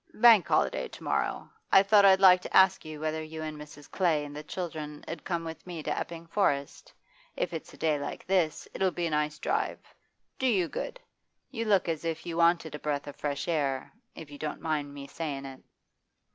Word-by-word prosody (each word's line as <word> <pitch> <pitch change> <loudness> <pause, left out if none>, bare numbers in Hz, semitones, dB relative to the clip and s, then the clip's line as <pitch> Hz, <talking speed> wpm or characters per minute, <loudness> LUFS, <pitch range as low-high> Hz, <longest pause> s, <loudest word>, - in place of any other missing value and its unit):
'Bank 225 -4 +7
holiday - - +1
to - - -12
morrow. - - -1 0.2
I 195 - +8
thought 200 0 +6
I'd 190 -1 +7
like 185 -2 +7
to - - 0
ask 190 0 +5
you 155 -1 -8
whether 155 +1 -2
you 155 0 -7
and 155 -1 -5
Mrs. 150 -1 -11
Clay 160 -6 +1
and 145 0 -9
the 150 - -5
children 155 -2 -6
'ud 165 - -6
come 170 -2 -2
with 160 +2 -8
me 170 -3 -6
to - - -1
Epping 170 0 -5
Forest. 145 -6 -1 0.5
If - - -1
it's - - -6
a - - -18
day 155 -2 +1
like 145 - -6
this, 180 -5 +1
it'll 190 - +1
be 175 -1 -3
a 165 - -2
nice 150 0 0
drive - - -1 0.6
do 260 - +2
you 190 -8 +2
good. - - -5 0.5
You 230 -4 -3
look 200 -5 +3
as 165 -2 -2
if 165 -1 -3
you 170 - -4
wanted 170 -2 +3
a 150 - -5
breath 145 -1 -2
of 145 - -8
fresh 145 -1 -3
air, 140 -6 -1 0.2
if 155 -3 -10
you 145 - -10
don't 155 -1 -4
mind 150 -3 -2
me 140 -1 -8
sayin' 140 -2 -5
it. 135 -1 -9
160 Hz, 215 wpm, -29 LUFS, 150-180 Hz, 0.6 s, I